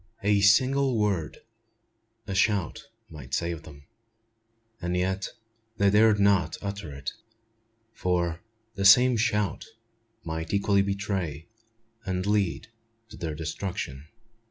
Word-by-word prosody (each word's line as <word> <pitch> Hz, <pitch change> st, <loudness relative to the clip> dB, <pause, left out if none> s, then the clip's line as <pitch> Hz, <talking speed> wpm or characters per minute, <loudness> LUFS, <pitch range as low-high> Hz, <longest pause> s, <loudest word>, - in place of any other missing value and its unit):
A 100 Hz, 0 st, +3 dB
single 130 Hz, +5 st, +4 dB
word 100 Hz, -7 st, -1 dB, 0.8 s
a 100 Hz, -, -5 dB
shout 100 Hz, -3 st, 0 dB, 0.2 s
might 65 Hz, -4 st, -6 dB
save 85 Hz, -1 st, -2 dB
them; 70 Hz, -3 st, -14 dB, 1.0 s
and 90 Hz, +1 st, -1 dB
yet 95 Hz, +1 st, -1 dB, 0.5 s
they 100 Hz, -2 st, +3 dB
dared 105 Hz, 0 st, +5 dB
not 100 Hz, -1 st, +2 dB
utter 100 Hz, -5 st, -5 dB
it; 70 Hz, -1 st, -5 dB, 0.8 s
for 85 Hz, -4 st, -1 dB, 0.3 s
the 100 Hz, -, -3 dB
same 125 Hz, +6 st, +7 dB
shout 105 Hz, -3 st, 0 dB, 0.6 s
might 80 Hz, +3 st, -3 dB
equally 100 Hz, 0 st, +3 dB
betray, 100 Hz, -6 st, -3 dB, 0.6 s
and 95 Hz, -2 st, -2 dB
lead 105 Hz, -2 st, 0 dB, 0.4 s
to 105 Hz, -, -12 dB
their 80 Hz, -3 st, -4 dB
destruction. 80 Hz, -3 st, -5 dB
100 Hz, 110 wpm, -27 LUFS, 85-105 Hz, 1.0 s, same